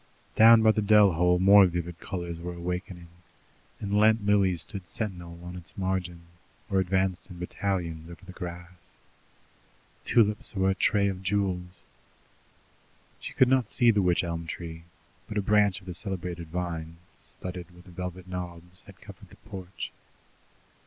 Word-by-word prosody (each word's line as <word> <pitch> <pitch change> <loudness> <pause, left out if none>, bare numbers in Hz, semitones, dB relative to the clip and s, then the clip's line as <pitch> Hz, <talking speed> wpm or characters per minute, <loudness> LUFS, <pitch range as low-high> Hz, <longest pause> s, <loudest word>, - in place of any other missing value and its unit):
Down 115 0 +8
by 110 - +7
the 110 - 0
dell 105 -1 +6
hole 90 +2 +3
more 100 +1 +7
vivid 85 -1 -4
colours 85 -3 -5
were 90 +1 -6
awakening, 90 0 -5 0.7
and 100 0 -2
Lent 110 0 +4
Lilies 100 -4 +3
stood 95 -5 -8
sentinel 90 -6 -4
on 90 0 -8
its 90 -1 -10
margin, 95 -3 -2 0.5
or 95 - +3
advanced 95 -1 0
in 90 - -10
battalions 85 -3 -3
over 85 +1 -12
the 95 - -10
grass. 90 -1 -9 1.1
Tulips 105 -3 +2
were 95 0 +2
a - - +1
tray 100 +1 +2
of 95 -1 -3
jewels. 95 -2 -2 1.4
She - - -7
could 130 - +5
not 130 -3 +2
see 120 -1 +4
the 105 -2 +2
wych 90 -1 +2
elm 85 -1 -4
tree, 80 -1 -7 0.4
but 105 - -4
a - - +2
branch 105 -2 +3
of - - -18
the 90 - -6
celebrated 90 -2 -3
vine, 85 -1 -4 0.2
studded 90 -2 -8
with 90 +1 -17
velvet 90 0 -7
knobs, 90 -1 -7
had - - -15
covered - - -13
the - - -15
porch. 95 -4 -8
90 Hz, 155 wpm, -27 LUFS, 85-100 Hz, 1.4 s, Down